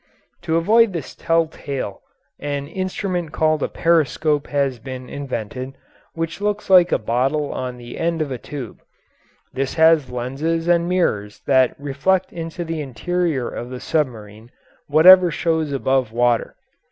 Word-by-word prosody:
To 165 -1 0
avoid 215 +5 +4
this 165 -5 -5
tell 165 0 +1
tale 140 -9 -6 0.4
an 145 -1 -3
instrument 185 -1 -3
called 155 -1 +1
a - - 0
periscope 155 -2 +1
has 140 -4 -1
been 130 +1 -8
invented, 130 -1 -5 0.4
which 165 +3 -4
looks 205 -1 -2
like 180 -1 +7
a - - +3
bottle 135 +6 -1
on 125 -1 -4
the 120 0 -9
end 165 0 0
of 150 -3 -2
a 125 - -4
tube; 130 0 -8 0.7
this 135 0 -2
has 160 -4 +4
lenses 140 +7 -2
and 170 0 +2
mirrors 105 - -1
that 130 -2 +3
reflect 160 +7 0
into 165 +1 -5
the 165 -1 -3
interior 150 +1 -2
of 120 - -6
the 125 0 -6
submarine 115 -8 -3 0.4
whatever 180 +4 +7
shows 160 -2 -1
above 135 -3 0
water. 120 0 +1
150 Hz, 145 wpm, -21 LUFS, 130-165 Hz, 0.7 s, like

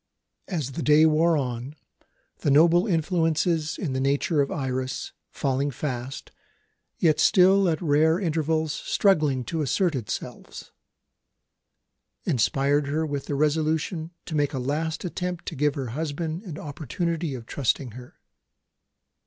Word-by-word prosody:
As 155 -8 -3
the 150 - -5
day 150 +2 +5
wore 160 +1 +3
on, 125 +1 -4 0.6
the - - 0
noble 170 +7 +5
influences 165 -2 +1
in 155 -9 -3
the 130 - -1
nature 140 +3 +1
of 140 - 0
Iris, 130 -1 -3 0.2
failing 135 +1 -1
fast, 130 -1 -5 0.7
yet 155 -3 +3
still 190 +2 +5
at 160 -2 0
rare 160 +2 +3
intervals 160 -3 0
struggling 155 -12 +2
to 160 +6 -3
assert 170 +4 +1
themselves, 120 -7 -6 1.5
inspired 140 +4 +1
her 155 +3 0
with 145 -2 -4
the 145 - -2
resolution 155 +3 0 0.2
to - - -7
make 145 -1 +1
a - - -2
last 155 +7 -2
attempt 180 0 -4
to - - -5
give 150 +1 +1
her 135 -4 -4
husband 155 +5 -3
an 160 -5 -7
opportunity 160 +1 -3
of 120 -2 -8
trusting 130 0 -1
her. 125 +2 -12
150 Hz, 135 wpm, -25 LUFS, 140-165 Hz, 1.5 s, day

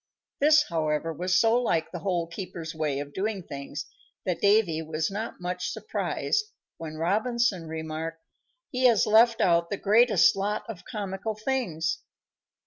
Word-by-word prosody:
This, 305 +1 +6
however, 160 0 -1
was 175 +3 +1
so 230 +3 +4
like 165 -9 0
the 175 - -5
Hole 175 -2 -1
keeper's 170 -1 -7
way 155 -3 -1
of 145 0 -6
doing 200 +1 -2
things 140 0 -6 0.4
that 180 -2 -1
Davy 200 -6 +3
was 160 +2 -2
not 215 0 -5
much 180 0 -3
surprised 430 -1 -1 0.3
when 155 -2 -7
Robinson 205 +1 0
remarked, 160 +1 -5 0.5
"He 255 0 0
has 235 -4 +5
left 225 +2 +5
out 170 -1 +3
the 200 - -2
greatest 210 -1 +5
lot 205 +2 -2
of 220 -6 -8
comical 205 -1 -4
things!" 215 -9 -1
180 Hz, 145 wpm, -27 LUFS, 160-220 Hz, 0.5 s, This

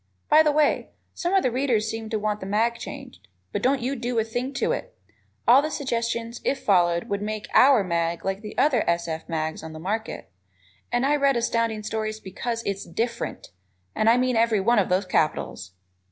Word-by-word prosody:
By 310 - +7
the 305 -1 +3
way, 300 0 +2 0.2
some 355 +2 -1
of 385 - +4
the 255 - +1
readers 240 -4 +1
seem 225 -1 -5
to 220 - -1
want 210 0 -1
the 190 - -7
mag 225 +4 +1
changed, - - -9 0.2
but - - -2
don't 260 -1 +1
you 265 +3 -1
do 240 -1 -3
a 225 - +3
thing 245 +4 -3
to - - 0
it. - - -5 0.5
All 255 +4 +8
the 305 - -2
suggestions, 235 -4 -3
if 275 - +1
followed, 175 -3 +3
would 200 0 -2
make 215 0 -4
"our" 260 -5 +6
mag 170 -1 -1
like 195 +1 -2
the 210 -1 -9
other 275 -6 +3
S. 170 0 0
F. 160 +1 -5
mags 160 -1 -2
on 160 0 -8
the 155 - -8
market, 210 +6 -4 0.6
and 245 +2 +1
I 290 +2 +3
read 275 -3 +3
Astounding 230 -2 0
Stories 215 0 -3
because 230 +4 -4
it - - 0
is - - -8
DIFFERENT, 235 +1 -4 0.4
and 215 - +2
I 235 - +5
mean 255 0 +1
every 225 -2 +3
one 230 +4 +3
of 195 - +1
those 185 +2 +1
capitals! 105 - -1
225 Hz, 210 wpm, -25 LUFS, 200-250 Hz, 0.6 s, All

